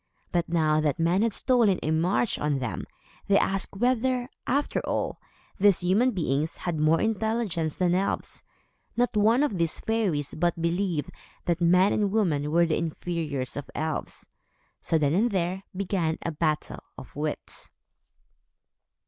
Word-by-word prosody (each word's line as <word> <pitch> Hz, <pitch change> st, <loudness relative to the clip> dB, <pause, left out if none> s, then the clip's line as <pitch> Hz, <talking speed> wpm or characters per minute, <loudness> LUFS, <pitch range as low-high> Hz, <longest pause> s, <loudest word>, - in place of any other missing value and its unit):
But 175 Hz, -1 st, 0 dB
now 155 Hz, -2 st, +2 dB
that 150 Hz, -3 st, 0 dB
men 170 Hz, +4 st, +2 dB
had 230 Hz, 0 st, +2 dB
stolen 230 Hz, -4 st, +3 dB
a 155 Hz, -, 0 dB
march 180 Hz, +8 st, +1 dB
on 150 Hz, -1 st, 0 dB
them, 125 Hz, -7 st, -4 dB, 0.4 s
they 200 Hz, -, +5 dB
asked 195 Hz, 0 st, 0 dB
whether, 250 Hz, +2 st, +1 dB, 0.2 s
after 285 Hz, +3 st, +1 dB
all, -, -, -2 dB, 0.4 s
these 200 Hz, -2 st, +5 dB
human 195 Hz, +8 st, +3 dB
beings 155 Hz, -, -1 dB
had 170 Hz, -3 st, -3 dB
more 155 Hz, +2 st, +4 dB
intelligence 220 Hz, -7 st, -1 dB
than 180 Hz, -1 st, +1 dB
elves. 190 Hz, +2 st, -2 dB, 0.5 s
Not 245 Hz, -1 st, +1 dB
one 225 Hz, +6 st, +4 dB
of 210 Hz, -11 st, -1 dB
these 165 Hz, -1 st, 0 dB
fairies 195 Hz, -11 st, -1 dB
but 170 Hz, +1 st, 0 dB
believed 170 Hz, -2 st, -1 dB, 0.3 s
that 175 Hz, 0 st, 0 dB
men 180 Hz, +3 st, +4 dB
and 205 Hz, -2 st, +1 dB
women 160 Hz, -9 st, +1 dB
were 170 Hz, +2 st, +4 dB
the 160 Hz, -, 0 dB
inferiors 160 Hz, -5 st, -3 dB
of 145 Hz, 0 st, -6 dB
elves. 155 Hz, 0 st, -3 dB, 0.6 s
So, 165 Hz, -, +1 dB
then 145 Hz, -1 st, +1 dB
and 220 Hz, +7 st, +3 dB
there, 185 Hz, -1 st, -2 dB
began 180 Hz, -4 st, 0 dB
a 170 Hz, -, -2 dB
battle 155 Hz, -1 st, -1 dB, 0.2 s
of 130 Hz, -, -11 dB
wits. 150 Hz, +1 st, -4 dB
175 Hz, 150 wpm, -27 LUFS, 155-205 Hz, 0.6 s, they